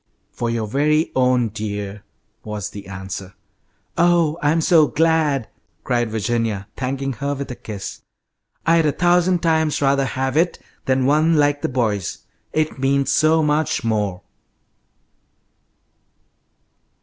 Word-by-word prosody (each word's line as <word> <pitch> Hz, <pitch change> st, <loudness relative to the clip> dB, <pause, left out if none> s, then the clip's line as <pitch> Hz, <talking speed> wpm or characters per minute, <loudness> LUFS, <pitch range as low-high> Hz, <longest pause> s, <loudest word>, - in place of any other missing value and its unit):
"For 120 Hz, -, -3 dB
your 115 Hz, -1 st, -1 dB
very 150 Hz, +7 st, +1 dB
own, 125 Hz, -2 st, +2 dB
dear," 105 Hz, -1 st, -5 dB, 0.4 s
was 105 Hz, -3 st, -5 dB
the 100 Hz, -1 st, -9 dB
answer. 95 Hz, 0 st, -7 dB, 0.6 s
"Oh, 170 Hz, -2 st, +3 dB
I'm 150 Hz, +2 st, +2 dB
so 160 Hz, -2 st, +5 dB
glad!" 155 Hz, -6 st, +1 dB, 0.4 s
cried 120 Hz, -3 st, 0 dB
Virginia, 110 Hz, -2 st, -1 dB
thanking 135 Hz, +1 st, -3 dB
her 140 Hz, +3 st, -3 dB
with 140 Hz, -1 st, -5 dB
a -, -, -5 dB
kiss. 105 Hz, -5 st, -7 dB, 0.6 s
"I'd 165 Hz, -1 st, +4 dB
a -, -, +3 dB
thousand 175 Hz, 0 st, +2 dB
times 160 Hz, -2 st, +2 dB
rather 140 Hz, -1 st, +2 dB
have 130 Hz, 0 st, -2 dB
it 170 Hz, +2 st, +2 dB, 0.3 s
than 130 Hz, -1 st, +1 dB
one 155 Hz, +4 st, +3 dB
like 145 Hz, -1 st, +2 dB
the -, -, -1 dB
boys'. 110 Hz, -7 st, -2 dB, 0.3 s
It 155 Hz, -3 st, -1 dB
means 135 Hz, +1 st, +1 dB
so 160 Hz, +1 st, +3 dB
much 150 Hz, -2 st, 0 dB
more!" 105 Hz, -5 st, -1 dB
135 Hz, 125 wpm, -21 LUFS, 110-155 Hz, 0.6 s, so